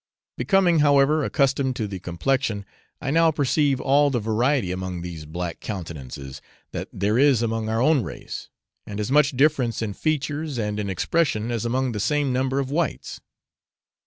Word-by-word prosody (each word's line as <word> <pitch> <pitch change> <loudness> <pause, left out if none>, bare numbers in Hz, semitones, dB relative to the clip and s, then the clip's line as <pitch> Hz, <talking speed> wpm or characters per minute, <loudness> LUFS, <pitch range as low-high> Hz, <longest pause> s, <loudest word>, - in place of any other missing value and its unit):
Becoming, 185 -5 +3
however, 145 +1 +4
accustomed 135 -2 +1
to 110 -4 -2
the 95 -2 -6
complexion, 100 +4 -1 0.3
I 135 - -3
now 165 +1 +5
perceive 145 -2 +1
all 145 +2 +3
the 125 -3 0
variety 115 0 +1
among 90 -1 -4
these 85 -4 -7
black 85 +2 -5
countenances 70 - -7 0.3
that - - -4
there 105 +5 0
is 135 -4 +4
among 115 -1 -1
our 115 +2 +1
own 155 -2 +4
race, - - -7 0.4
and 105 0 -5
as 105 +4 -2
much 145 -2 +3
difference 135 -5 +2
in 110 -3 -2
features 150 +1 -2
and 105 -2 -2
in 100 -1 -2
expression 115 - 0
as 115 -1 -2
among 130 +2 0
the 105 - -4
same 140 +5 +1
number 130 +1 0
of 135 -1 -1
whites. 160 -2 -2
125 Hz, 165 wpm, -24 LUFS, 105-145 Hz, 0.4 s, now